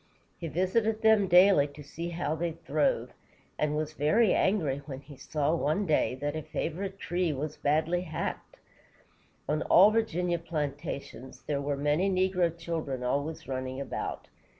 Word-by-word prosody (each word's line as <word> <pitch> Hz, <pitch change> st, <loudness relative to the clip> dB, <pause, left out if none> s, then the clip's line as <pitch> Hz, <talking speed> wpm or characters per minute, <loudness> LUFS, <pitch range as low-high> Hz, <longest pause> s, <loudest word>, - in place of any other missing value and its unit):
He 170 Hz, -, -4 dB
visited 215 Hz, +7 st, 0 dB
them 220 Hz, -3 st, +5 dB
daily 180 Hz, -4 st, +6 dB
to 145 Hz, +1 st, -12 dB
see 165 Hz, +4 st, -6 dB
how 170 Hz, -2 st, -2 dB
they 165 Hz, +1 st, -2 dB
throve, -, -, 0 dB, 0.5 s
and 150 Hz, 0 st, +1 dB
was 155 Hz, 0 st, -2 dB
very 155 Hz, +10 st, +3 dB
angry 155 Hz, -9 st, +1 dB
when 135 Hz, -2 st, -6 dB
he 140 Hz, +1 st, -13 dB
saw, 150 Hz, +2 st, -1 dB
one 165 Hz, +5 st, 0 dB
day, 155 Hz, -6 st, +2 dB
that 145 Hz, +3 st, -3 dB
a 155 Hz, -, -2 dB
favorite 190 Hz, +6 st, -4 dB
tree 175 Hz, -3 st, -1 dB
was 150 Hz, +2 st, -4 dB
badly 160 Hz, +4 st, +1 dB
hacked. 160 Hz, -3 st, -5 dB, 0.9 s
On 155 Hz, +1 st, 0 dB
all 200 Hz, +4 st, +6 dB
Virginia 180 Hz, -6 st, 0 dB
plantations, 140 Hz, -5 st, -5 dB
there 140 Hz, -2 st, -2 dB
were 140 Hz, 0 st, -2 dB
many 150 Hz, +7 st, +1 dB
negro 185 Hz, -3 st, +1 dB
children 160 Hz, -6 st, -3 dB
always 140 Hz, +5 st, -2 dB
running 130 Hz, 0 st, -4 dB
about. 140 Hz, -, -4 dB
160 Hz, 150 wpm, -29 LUFS, 145-180 Hz, 0.9 s, daily